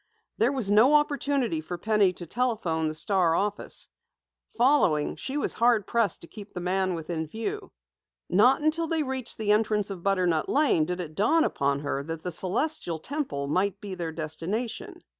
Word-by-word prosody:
There 235 +4 +3
was 250 -8 -2
no 235 +8 +6
opportunity 280 - +1
for 175 +3 -6
Penny 210 0 +3
to 175 - -8
telephone 195 -7 -1
the 155 - -3
Star 170 0 +2
office. 205 +2 -2 0.7
Following, 235 - +3
she 270 +2 -4
was 290 - 0
hard 230 -3 +3
pressed 230 -2 0
to 170 - -11
keep 205 +2 -12
the - - -3
man 185 +1 0
within 160 -1 -4
view. 385 - -5 0.6
Not 245 +10 +4
until 320 +2 +1
they 320 -1 0
reached 260 -3 -4
the 215 -2 0
entrance 210 -1 +1
of 185 -3 -6
Butternut 180 -4 +1
Lane 275 - +3
did 180 +2 -3
it 155 -3 -7
dawn 315 - +3
upon 140 0 0
her 145 -1 -2
that 160 +2 -6
the 180 - -3
Celestial 185 - -1
Temple 160 - -3
might 190 +6 0
be 200 -2 -7
their 170 -3 -4
destination. 220 - -4
200 Hz, 175 wpm, -27 LUFS, 165-250 Hz, 0.7 s, no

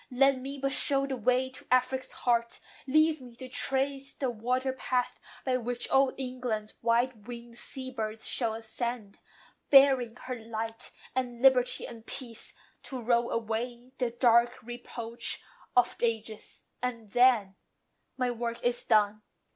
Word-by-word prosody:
Let 270 +1 +4
me 275 +2 -6
but 275 0 -1
show 275 0 +3
the 275 -1 -2
way 255 +2 +1
to - - -12
Afric's 255 +1 +2
heart: 235 -1 0 0.3
Leave 310 +1 +4
me 245 -2 -12
to 255 +1 -8
trace 270 +2 -1
the 265 -3 -1
water 250 +4 0
path 250 -1 -1 0.3
by 255 -1 +2
which 245 0 -3
Old 270 0 +4
England's 250 -5 -3
white 235 -2 +1
wing'd 235 -1 -8
sea 260 -1 -7
birds 220 -3 -4
shall 230 -3 0
ascend, 225 -1 -4 0.5
Bearing 265 -4 +6
her 255 - -3
light, 225 0 -4 0.2
and 250 -1 -2
liberty, 255 -2 +5
and 225 -1 -9
peace, 235 -4 -5 0.3
To 260 - -6
roll 235 0 +2
away 235 +2 -3
the 250 -2 +1
dark 240 0 +3
reproach 235 0 -4 0.3
of 245 - +4
ages; 225 -2 -2 0.2
And 230 -4 -4
then, 245 -6 +5 0.6
MY 250 -1 +1
WORK 235 0 -4
IS 245 0 +1
DONE." 215 -1 +3
245 Hz, 145 wpm, -30 LUFS, 230-260 Hz, 0.6 s, Bearing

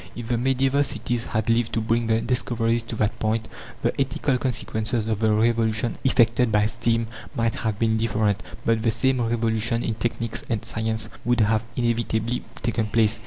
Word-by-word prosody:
If 120 -1 -7
the 120 - +1
medieval 135 +2 +2
cities 120 -2 -1
had 110 -2 -2
lived 115 0 +2
to - - +1
bring 115 +1 0
their 110 0 +2
discoveries 120 -1 0
to - - -3
that 110 0 -1
point, 110 +1 0 0.4
the - - +2
ethical 135 0 0
consequences 115 -3 -1
of 110 -2 -1
the 110 -1 +3
revolution 110 +1 +1
effected 120 -2 +3
by 105 0 +3
steam 115 +1 0 0.3
might 115 -1 +1
have 110 -3 -2
been 110 0 +2
different; 110 -2 +1 0.2
but 115 -1 +2
the 115 - +2
same 130 +3 +1
revolution 115 0 0
in 115 - -1
technics 115 0 -3
and 115 -4 -1
science 110 0 -2 0.2
would 120 0 +2
have 110 +1 +2
inevitably 120 0 0 0.2
taken 115 -1 0
place. 110 0 +2
115 Hz, 175 wpm, -24 LUFS, 110-120 Hz, 0.4 s, the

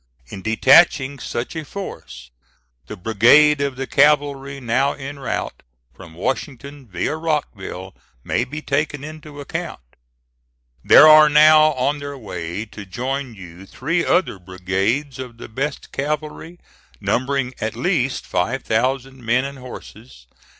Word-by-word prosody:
In 95 - -8
detaching 135 - +4
such 120 +4 -5
a 160 - -4
force, 150 - -9 0.6
the 105 - -8
brigade 120 +10 +4
of 140 -2 -1
the 135 +1 -4
cavalry 140 -1 +2
now 130 +3 0
en 140 +1 -8
route 135 - -4 0.3
from 85 -4 -14
Washington 135 - -5
via 90 - -3
Rockville 110 - -4 0.3
may 120 - 0
be 150 +5 -7
taken 145 -1 -2
into 155 -1 -10
account. 140 - -5 1.0
"There 155 - +8
are 155 0 +8
now 155 +1 +6
on 140 +3 -1
their 145 0 -7
way 90 -3 -6
to 105 -1 -10
join 125 +5 -4
you 90 0 -12
three 165 - -2
other 175 - +1
brigades 95 +10 -2
of 125 -3 -8
the - - -9
best 135 +6 -5
cavalry, 150 +4 -4 0.4
numbering 130 0 -1
at 110 0 -3
least 145 -8 -1
five 115 +10 -2
thousand 130 +3 -1
men 120 +3 +1
and 140 -1 -8
horses. 120 - -12
135 Hz, 135 wpm, -20 LUFS, 110-145 Hz, 1.0 s, There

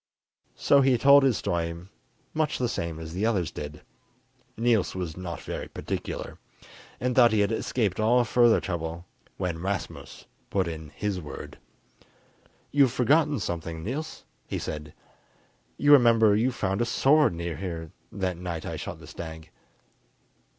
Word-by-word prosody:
So 140 - +4
he 130 -2 +4
told 140 +3 +7
his 130 -6 +3
story 85 -1 -2 0.6
much 155 -1 0
the 125 - 0
same 85 -8 -3
as 80 0 -8
the 95 +4 -2
others 95 -9 0
did 75 +1 -8 0.7
(Niels 115 -5 +2
was 90 -4 -4
not 90 -3 -6
very - - -5
particular), - - -5 0.6
and 125 0 -1
thought 120 -3 +6
he 110 -1 +3
had 100 - +1
escaped 110 -3 -1
all 120 +3 +4
further 120 0 +4
trouble, 85 -1 -4 0.3
when 90 -3 -2
Rasmus 95 +1 -5 0.2
put 95 -3 0
in 80 -2 -6
his 95 +5 -3
word. 75 - -9 1.1
"You've 140 -4 +4
forgotten 145 +3 +2
something, 85 -3 -4
Niels," 150 - -5 0.2
he - - -3
said; 75 -1 -6 0.8
"you 145 - +3
remember 115 -6 +6
you 120 +5 +2
found 95 -3 -1
a - - +2
sword 135 - +3
near 85 -2 -4
here 80 -3 -5 0.2
that 95 -3 -2
night 85 -2 -5
I - - -4
shot - - -6
the - - -13
stag." 80 -1 -9
100 Hz, 150 wpm, -27 LUFS, 85-120 Hz, 1.1 s, told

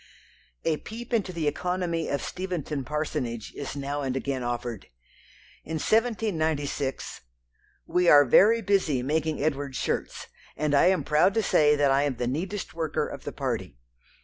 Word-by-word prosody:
A 155 - +2
peep 235 +6 -8
into 205 -5 +1
the 165 -4 -2
economy 175 +1 -1
of 140 - -1
Steventon 170 -6 -4
parsonage 125 -5 -3
is 140 - -5
now 140 +1 -3
and 130 -2 -2
again 135 -1 -2
offered. 120 -3 -4 0.8
In 160 - -5
1796, 160 - -1 0.6
"We 180 -1 +2
are 145 -1 +8
very 225 - +5
busy 185 -10 +1
making 155 +1 -1
Edward's 140 -3 -1
shirts, - - -2 0.3
and 150 0 0
I 140 - +5
am 185 0 +2
proud 155 +7 +3
to 225 - +2
say 150 -5 +4
that 145 -2 +3
I 135 +1 +4
am 145 -2 0
the 120 - -2
neatest 180 +10 -3
worker 165 -2 -1
of - - -9
the - - -3
party. - - -4
150 Hz, 155 wpm, -27 LUFS, 140-180 Hz, 0.8 s, are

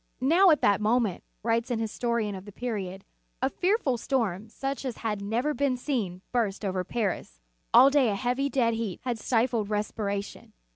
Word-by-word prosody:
"Now, 335 +9 +5
at 310 - +4
that 200 0 +3
moment," 220 -3 +1 0.2
writes 230 +2 +1
an 240 -2 -1
histo 225 +2 -3
rian 220 -4 0
of 190 0 -9
the 205 - -10
period, 195 -5 -4 0.3
"a - - 0
fearful 360 - +1
storm, 220 -6 -1
such 270 +4 -4
as 255 -4 -4
had 210 -2 -1
never 235 +9 0
been 275 -3 0
seen, 215 -9 -3
burst 215 -4 -1
over 185 -1 -1
Paris. 190 - -3 0.3
All 275 - +8
day 275 -5 +4
a 205 - 0
heavy, 255 +5 0
dead 240 -4 +2
heat 225 -5 -3
had 245 -3 -2
stifled 230 -3 +1
respi 210 +1 -2
ration. 200 0 -4
230 Hz, 185 wpm, -27 LUFS, 205-255 Hz, 0.3 s, All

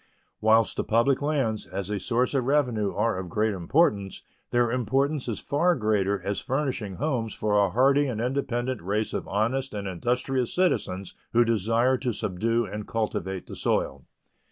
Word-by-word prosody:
Whilst 110 +1 +4
the - - 0
public 120 +5 +2
lands, 135 - 0
as 95 +3 -4
a 105 - -1
source 125 +7 0
of 130 -3 +1
revenue, 125 -8 +1
are 105 -2 0
of 90 -2 -6
great 105 +4 +1
importance, 100 - +1 0.3
their 120 -1 +2
importance 135 +4 0
is 115 - -2
far 170 +5 +2
greater 105 -5 +1
as 100 0 -2
furnishing 130 -8 -2
homes 125 -5 -2
for 105 -1 0
a 100 - +2
hardy 135 +7 +3
and 120 -5 -3
independent 125 -1 -1
race 105 +5 -1
of - - -3
honest 115 +5 -1
and 100 -1 -4
industrious 125 +7 -1
citizens 100 - 0 0.2
who 120 +1 +5
desire 115 +4 +2
to 125 -3 -1
subdue 115 +5 0
and 105 +1 -6
cultivate 95 -4 -2
the - - -9
soil. - - -1
115 Hz, 165 wpm, -26 LUFS, 105-130 Hz, 0.3 s, who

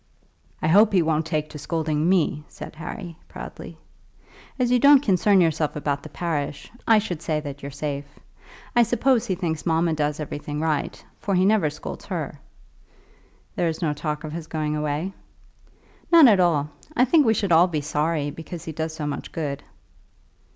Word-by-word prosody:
"I - - +2
hope 205 +6 +5
he 180 -3 +4
won't 160 0 0
take 155 -2 -2
to 150 - -8
scolding 155 +1 -1
me," 165 -5 +2
said - - -10
Harry, 165 +1 -7
proudly. - - -9 0.8
"As 250 -2 +1
you 250 - +4
don't 285 +1 +7
concern 195 -2 +4
yourself 160 -2 +1
about 145 -1 -2
the - - -10
parish, 150 -4 -3 0.2
I 225 - +6
should 180 -7 -2
say 155 -3 -1
that 145 -1 -7
you're 140 - -6
safe. 145 0 -4 0.7
I 240 - +6
suppose 240 +1 +2
he 185 - 0
thinks 165 -4 -3
mamma 165 0 +1
does 150 -1 -1
everything 150 0 -5
right, 155 -2 -2
for 195 - -1
he 185 +1 +3
never 200 -6 +3
scolds 80 - -8
her." - - -4 1.2
"There 175 - +1
is 160 +2 -4
no 150 -2 +1
talk 150 +1 -4
of 155 -1 -6
his 165 -1 -6
going 155 -2 -2
away." 150 +5 -2 1.0
"None 330 -5 +9
at 205 -5 +5
all. 150 -5 +2 0.2
I 250 - +5
think 305 +4 +5
we 225 - +4
should 200 -4 -1
all 170 +2 +6
be 155 -4 -2
sorry, 150 0 -1
because 165 +2 -8
he 160 - -4
does 160 +1 -4
so 155 - -4
much 145 - -5
good." 145 -4 -3
160 Hz, 180 wpm, -24 LUFS, 150-185 Hz, 1.2 s, None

